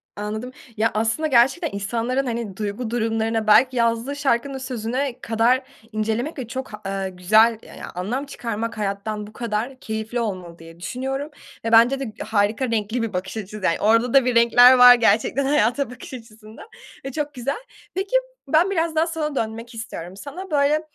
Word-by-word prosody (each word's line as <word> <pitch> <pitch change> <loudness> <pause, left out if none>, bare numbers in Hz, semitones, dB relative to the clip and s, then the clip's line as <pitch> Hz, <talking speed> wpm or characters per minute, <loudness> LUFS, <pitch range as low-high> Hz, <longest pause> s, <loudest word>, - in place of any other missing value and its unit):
Anladım. 215 +4 -5 0.3
Ya, 225 +1 +2
aslında 225 +8 0
gerçekten 270 +5 +3
insanların, 235 +6 -1
hani, 230 -5 -4
duygu 215 +3 -3
durumlarına, 225 -1 -1
belki 255 +4 +5
yazdığı 230 +4 0
şarkının 275 -1 0
sözüne 255 +1 -3
kadar 240 +2 +2 0.3
incelemek 220 +8 -2
ve 245 - -5
çok 260 -2 -6
ha 210 - -8
eee, 195 -1 -2
güzel, 215 +5 +3
ya - - -13
ya - - -8
anlam 235 +10 -3
çıkarmak, 230 -4 -4
hayattan 210 +1 -3
bu 215 - -15
kadar 235 +3 -3
keyifli 220 +2 -4
olmalı 185 -6 -4
diye 165 0 -13
düşünüyorum. 265 - -4 0.4
Ve 225 - -1
bence 240 +4 +6
de 240 -6 -5
harika, 220 +3 0
renkli 220 +2 -1
bir 225 -2 -3
bakış 185 +4 -4
açısı, 210 0 -7
yani. 165 - +1
Orada 230 +3 +3
da 270 -2 +6
bir 250 -1 +1
renkler 245 +2 +7
var 245 0 +10
gerçekten, 235 +4 +2
hayata 270 -1 +2
bakış 250 +1 -11
açısında 220 -2 -12 0.4
ve 270 - -4
çok 295 +1 -3
güzel. 270 - -3 0.3
Peki, 385 +5 -2 0.3
ben 320 +7 +3
biraz 325 -3 0
daha 320 +2 +2
sana 305 -3 -3
dönmek 230 +1 -4
istiyorum. 190 -5 -7
Sana 330 - -8
böyle, 295 +1 +3
230 Hz, 170 wpm, -22 LUFS, 215-265 Hz, 0.4 s, var